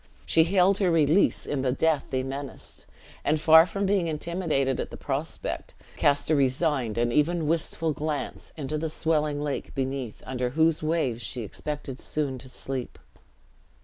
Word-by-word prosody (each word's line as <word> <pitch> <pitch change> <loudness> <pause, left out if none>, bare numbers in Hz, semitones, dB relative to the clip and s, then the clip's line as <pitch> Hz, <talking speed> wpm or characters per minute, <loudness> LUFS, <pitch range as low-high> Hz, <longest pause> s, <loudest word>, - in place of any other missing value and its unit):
She 160 -1 +4
hailed 190 +2 +3
her 190 -3 +3
release 165 +2 +3
in 140 -2 -2
the 130 -1 +1
death 150 +1 +1
they 130 -1 -1
menaced; 135 +1 -7 0.4
and 155 +1 +2
far 160 +2 +7
from 200 +2 -2
being 190 -3 +2
intimidated 155 -4 -1
at - - -3
the - - -9
prospect, - - -4 0.2
cast 145 +1 +2
a - - +5
resigned, 135 -4 +1
and 120 0 +1
even 160 +3 +2
wistful 165 0 0
glance, 150 0 -4
into 150 +1 -3
the 160 +1 -2
swelling 155 -2 0
lake 145 -1 -4
beneath, 135 -3 -3
under 125 -1 -2
whose 160 +4 +2
waves 155 -7 0
she 120 +1 -4
expected 140 +4 -5
soon 140 -4 -2
to 130 - -11
sleep. 130 -1 -4
150 Hz, 160 wpm, -27 LUFS, 135-160 Hz, 0.4 s, far